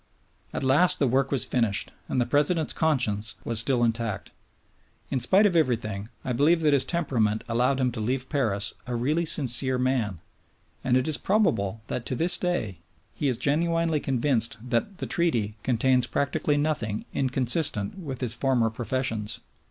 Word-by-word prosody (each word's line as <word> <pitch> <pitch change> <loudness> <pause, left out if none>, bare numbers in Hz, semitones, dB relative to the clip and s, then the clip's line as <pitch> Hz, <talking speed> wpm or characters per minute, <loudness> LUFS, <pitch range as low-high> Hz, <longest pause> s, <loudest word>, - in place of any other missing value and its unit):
At - - -4
last 145 +7 +3
the 140 - +1
work 135 +2 +1
was 135 - +1
finished; 115 -5 0 0.2
and - - -1
the 120 - +2
President's 150 +4 +1
conscience 120 -9 0
was 115 -2 +3
still 120 +1 +3
intact. 115 -3 -2 0.8
In 135 - 0
spite 190 - +4
of 190 -4 +2
everything, 110 -9 0 0.2
I 125 - -1
believe 160 +7 +3
that 150 -2 +3
his 140 - +4
temperament 115 -11 0
allowed 125 +4 +1
him 125 -1 +1
to 115 - -6
leave 125 +4 -2
Paris 110 -8 -1
a 125 - -3
really 150 +8 0
sincere 130 -3 +3
man; 125 -8 -1 0.6
and 125 0 +2
it 130 - 0
is 155 - +1
probable 115 - 0
that 120 0 -5
to 130 - -1
this 175 +5 +1
day 115 - -2 0.3
he 145 - -2
is 125 -3 0
genuinely 165 +2 0
convinced 120 -4 -1
that 125 - -1
the - - -5
Treaty 115 -12 0
contains 125 +1 +2
practically 140 +1 0
nothing 140 -8 -2
inconsistent 130 - +1
with 135 -8 -6
his 120 -3 +1
former 120 -2 +1
professions. 115 -2 -3
130 Hz, 165 wpm, -26 LUFS, 115-150 Hz, 0.8 s, spite